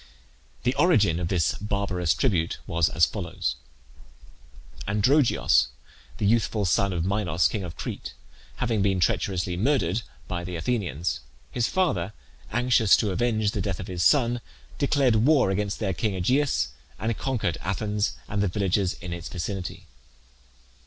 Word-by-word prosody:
The 125 - +2
origin 105 - +4
of 85 - -1
this 85 -2 +1
barbarous 100 -5 0
tribute 90 -11 0
was 85 -2 +1
as 80 +1 +4
follows: - - -3 1.3
Androgeos, 110 - +3 0.5
the - - -1
youthful 110 -1 +2
son 95 +3 +2
of 85 -2 -1
Minos, 95 -3 +2
king 105 - -3
of 85 -3 -7
Crete, - - -6 0.4
having 115 -4 0
been 95 -1 +2
treacherously 90 -2 0
murdered 110 - +1 0.3
by 85 -1 -3
the 90 0 -5
Athenians, 85 - -1 0.3
his 120 -2 0
father, 110 - 0 0.4
anxious 120 -2 +4
to 105 -3 0
avenge 110 0 +1
the 105 - -2
death 95 -1 -2
of 90 - -5
his 90 -2 -4
son, 120 - +3 0.4
declared 140 -5 +3
war 130 -2 +4
against 100 +1 -1
their 95 -4 -1
king 100 +3 -1
Aegeus, 125 - +1 0.3
and 115 +2 -1
conquered 115 -11 -1
Athens 105 +2 -1
and 100 0 -1
the 100 - +2
villages 95 0 0
in 90 -1 -5
its 85 -1 -6
vicinity. 90 +1 -5
100 Hz, 145 wpm, -26 LUFS, 90-115 Hz, 1.3 s, origin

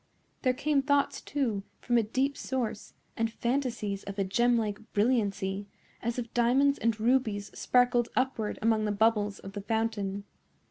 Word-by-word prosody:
There 255 -2 +2
came 285 +1 +2
thoughts, 285 0 +1
too, 245 -8 -1 0.2
from 240 - 0
a 235 - +6
deep 260 +6 0
source, 240 -5 -3 0.2
and 225 0 0
fantasies 235 -5 -2
of 200 0 -6
a 200 - +2
gemlike 220 +1 +1
brilliancy, 205 -3 +1 0.3
as 235 +1 -2
if 235 -2 -4
diamonds 265 +4 +3
and 225 -1 0
rubies 220 -4 +1
sparkled 245 -1 +2
upward 255 -5 0
among 220 -1 +3
the 210 - 0
bubbles 210 -1 +2
of 195 - -10
the 205 - -5
fountain. 205 -2 -1
230 Hz, 150 wpm, -29 LUFS, 205-250 Hz, 0.3 s, a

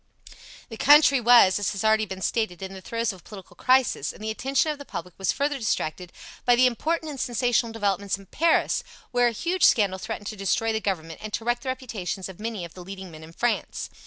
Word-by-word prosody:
The 225 - -8
country 280 -1 +6
was, 235 -5 +6
as 205 - -1
has 195 - -4
already 220 0 +3
been 190 0 -6
stated, 215 -6 -1
in 190 0 -6
the 190 - -9
throes 230 +2 -2
of 190 - -13
a - - -22
political 190 -4 -12
crisis, 255 +2 +2
and - - -13
the 220 - -2
attention 270 +7 0
of 295 - -7
the - - -7
public 180 -8 -7
was 195 - +1
further 285 0 -1
distracted 180 -5 -2 0.3
by 245 - +5
the 255 +1 +5
important 315 +6 -1
and 275 - -8
sensational 240 -1 +1
developments 200 -3 -1
in 195 - -15
Paris, 330 - +1 0.3
where 245 -1 +3
a - - +1
huge 345 - -2
scandal 195 -4 +4
threatened 220 0 -6
to 215 - -5
destroy 215 +3 0
the 220 - -1
Government 165 -6 -3
and 215 - -6
to 225 - -3
wreck 240 0 +1
the 265 - -5
reputations 220 -8 -4
of 190 -1 -11
many 215 -4 -4
of 170 - -12
the 185 - -10
leading 190 -1 -9
men 155 0 -11
in 160 - -12
France. 240 +8 -2
220 Hz, 230 wpm, -25 LUFS, 190-245 Hz, 0.3 s, country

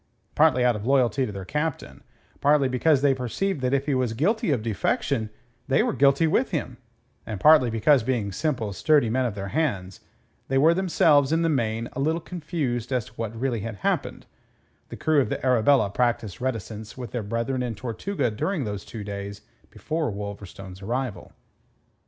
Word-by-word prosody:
Partly 125 0 +4
out 120 -2 +3
of 105 - -5
loyalty 130 -1 +2
to - - -5
their 100 -2 -7
captain, 150 +7 -3 0.4
partly 145 -1 +4
because 135 +3 +2
they 140 -1 +5
perceived 135 - -2
that 125 -1 0
if 140 0 +1
he 145 - 0
was 130 -3 0
guilty 185 - +1
of 125 -7 +1
defection 110 - -1 0.4
they 135 +10 +3
were 240 -2 0
guilty 140 +3 +4
with 160 - +2
him, - - -3 0.5
and 105 -4 -6
partly 150 -3 +6
because 120 +5 +3
being 110 -4 -1
simple, 115 - -2
sturdy 145 0 +3
men 130 +2 +1
of 110 - -5
their 100 -1 -5
hands, 100 - -2 0.5
they 135 - +1
were 155 +5 +5
themselves 160 -6 +3
in 165 +1 +2
the 165 - +2
main 115 -5 -1
a - - -5
little 160 +4 +1
confused 150 -9 -3
as 125 -4 0
to - - -15
what 115 -1 -5
really 125 -3 -1
had 110 +1 -5
happened, - - -1 0.6
the - - -8
crew 155 -2 +3
of 125 - -2
the - - -3
Arabella 125 -3 +3
practised 115 -3 -1
reticence 110 -3 -4
with 125 -5 -7
their 120 - -2
brethren 115 +5 -2
in 120 -3 -3
Tortuga 120 - -2
during 155 - -2
those 105 -3 -4
two 110 -3 -8
days 100 0 -6 0.3
before 155 -3 -3
Wolverstone's 100 -2 -8
arrival. 120 -2 -4
125 Hz, 180 wpm, -25 LUFS, 110-145 Hz, 0.6 s, partly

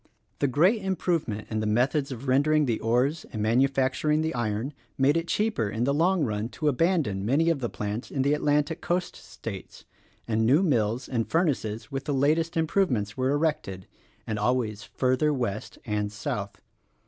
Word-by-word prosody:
The 140 - +2
great 180 - +3
improvement 165 - -1
in 110 - -1
the 110 - -1
methods 135 +6 +1
of 130 +2 -7
rendering 150 +3 +3
the 115 -4 0
ores 125 +8 +1
and 110 - -5
manufacturing 135 +6 +2
the 160 +1 -1
iron 120 +3 -2 0.2
made 135 +3 +3
it 165 0 -1
cheaper 210 - 0
in 110 +3 -2
the 140 +3 +2
long 170 +3 +2
run 110 -2 -2
to 155 - -1
abandon 145 - +1
many 145 +10 +3
of 160 - -1
the 120 -3 -2
plants 105 +3 -4
in 135 - -1
the 140 +2 +2
Atlantic 150 +1 +1
coast 180 +1 -1
states, - - -9 0.4
and 110 0 +1
new 140 +11 +4
mills 120 - +1
and 115 -4 -2
furnaces 140 - -1
with 135 0 -4
the 145 - -1
latest 155 +5 +1
improvements 150 - +1
were 130 0 0
erected 145 - -1 0.2
— - - -35
and 110 -1 -3
always 110 -2 0
further 130 +7 +1
West 120 -7 -3
and 105 -2 -1
South. 105 -1 -4
135 Hz, 175 wpm, -27 LUFS, 110-155 Hz, 0.4 s, new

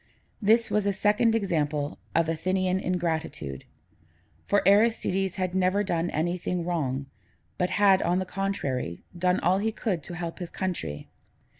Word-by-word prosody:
This 225 +3 +3
was 210 -1 +1
a 200 - +2
second 210 +3 +3
example 150 -8 -1 0.2
of 165 -1 +3
Athenian 185 +3 0
ingratitude; 160 - -2 0.8
for 200 -2 +2
Aristides 195 -3 +3
had 185 -2 -2
never 190 +2 +2
done 175 -3 -1
anything 175 +2 -1
wrong, 140 -6 -1 0.5
but 180 0 +1
had, 195 -1 +4
on 175 - +1
the 185 - -1
contrary, 140 - -3
done 180 +1 +2
all 185 +2 +3
he 220 +2 0
could 205 -6 -2
to 175 - -6
help 170 0 -5
his 175 -2 -5
country. 175 - -4
180 Hz, 145 wpm, -27 LUFS, 165-195 Hz, 0.8 s, had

